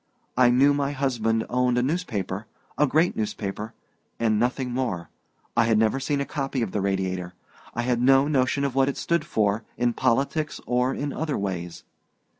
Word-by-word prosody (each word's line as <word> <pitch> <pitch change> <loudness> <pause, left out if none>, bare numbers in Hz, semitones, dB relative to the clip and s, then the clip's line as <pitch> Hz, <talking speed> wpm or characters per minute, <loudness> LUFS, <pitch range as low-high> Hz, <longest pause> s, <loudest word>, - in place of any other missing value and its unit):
I 125 -1 +5
knew 135 +4 +5
my 140 0 -1
husband 115 -5 0
owned 125 0 +1
a 125 - +2
newspaper 110 - -2 0.3
a 150 - +3
great 160 +6 +2
newspaper 105 0 -4 0.4
and 110 -2 +2
nothing 125 +2 0
more. 120 -10 -2 0.4
I 115 -1 +4
had 115 -1 +3
never 110 +4 +2
seen 140 +1 -1
a 140 - -1
copy 135 -4 -2
of 105 - -3
the 105 - -1
Radiator; 95 -2 -2 0.4
I 120 - -1
had 120 -1 +1
no 135 +2 +5
notion 140 -1 +1
what 135 0 +2
it 140 - -4
stood 170 -2 0
for, 110 -7 0
in 120 -1 +1
politics 135 +5 0
or 125 +1 +1
in 145 0 -3
other 155 -2 -2
ways. 90 -4 -4
125 Hz, 175 wpm, -25 LUFS, 110-140 Hz, 0.4 s, I